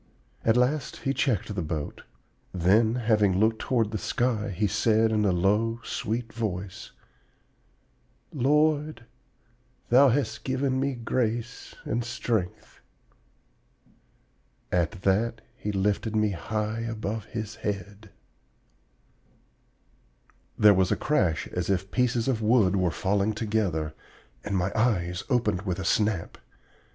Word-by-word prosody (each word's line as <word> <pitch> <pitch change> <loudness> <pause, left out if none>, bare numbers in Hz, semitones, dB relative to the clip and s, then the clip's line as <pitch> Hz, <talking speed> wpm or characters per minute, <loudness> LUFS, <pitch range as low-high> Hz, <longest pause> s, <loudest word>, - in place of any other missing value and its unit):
At 115 +1 +3
last 130 +3 0
he 135 - +1
checked 110 -7 0
the 95 - -2
boat; 80 -2 -4 0.5
then, 105 +6 +3
having 105 -5 +2
looked 110 +1 +2
toward 115 -5 0
the 110 - -3
sky, 120 -4 -1
he 100 +2 -1
said 110 +2 +2
in 105 -1 +2
a 100 - +3
low, 105 +6 +1
sweet 115 0 -3
voice, 95 -4 -4 1.4
'Lord, 150 -1 +1 0.8
Thou 130 +3 +7
hast 135 +3 -1
given 130 0 0
me 135 0 0
grace 120 0 -3
and 120 +2 -1
strength.' 115 -6 -3 1.9
At 90 +3 -1
that 110 +4 +1
he 105 - -4
lifted 105 +2 0
me 105 -1 +2
high 105 +4 -3
above 110 -2 -4
his 110 -3 -6
head 105 +1 -5 1.2
" - - -38
There 105 -1 +7
was 95 -1 +2
a - - +3
crash 90 - 0
as 90 0 -3
if 95 0 -1
pieces 125 -2 +1
of 120 -4 0
wood 110 -4 +3
were 90 -2 +2
falling 100 +4 0
together 105 -8 -1 0.5
and 100 -2 -1
my 90 +2 0
eyes 90 -6 0
opened 110 -8 +1
with 95 -3 -3
a 95 - -4
snap. 105 -5 0
110 Hz, 125 wpm, -27 LUFS, 95-120 Hz, 1.9 s, Thou